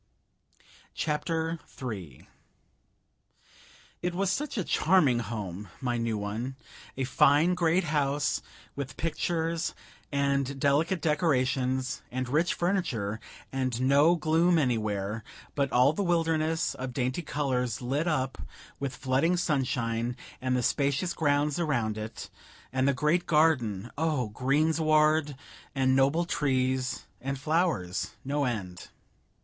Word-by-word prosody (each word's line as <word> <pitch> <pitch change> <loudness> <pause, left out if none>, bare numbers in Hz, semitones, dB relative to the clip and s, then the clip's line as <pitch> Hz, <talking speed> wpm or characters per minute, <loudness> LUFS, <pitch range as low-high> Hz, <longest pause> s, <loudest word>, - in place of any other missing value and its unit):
CHAPTER 160 +2 -1 0.2
III 95 - -6 1.7
It 175 0 -2
was 195 +1 +1
such 295 0 -2
a 200 - +1
charming 155 -9 +3
home! 105 -4 -5
my 125 -2 -1
new 115 -2 -1
one; 110 +6 -4 0.4
a 135 - 0
fine 145 +6 +4
great 175 +1 +2
house, 145 -2 0 0.3
with 140 -1 -5
pictures, 165 0 -1 0.4
and 140 -1 0
delicate 150 +5 +2
decorations, 130 -5 +1
and 130 +1 -3
rich 155 +7 +1
furniture, 135 - -1 0.3
and 130 -3 -1
no 140 +6 +5
gloom 165 +2 +3
anywhere, 110 -6 -1 0.3
but 140 -2 0
all 130 +4 +5
the 180 - -2
wilderness 165 -2 +1
of 130 0 -5
dainty 130 +5 -1
colors 130 -7 -1
lit 140 +6 -1
up 135 -5 -1 0.4
with 135 -2 -3
flooding 135 +7 +1
sunshine; 125 -6 -1 0.2
and 130 0 +1
the 125 - 0
spacious 140 +7 +1
grounds 145 0 +1
around 120 -10 0
it, 110 +1 -7 0.4
and 130 +1 +2
the 140 - +3
great 150 +6 +1
garden 125 - +2
oh, 150 -8 0
greensward, 155 +4 +2 0.4
and 130 -1 +3
noble 140 +6 +3
trees, 130 -4 0 0.2
and 135 +1 -3
flowers, 155 - 0
no 145 +1 0
end! 95 -8 -4
140 Hz, 120 wpm, -28 LUFS, 125-160 Hz, 1.7 s, no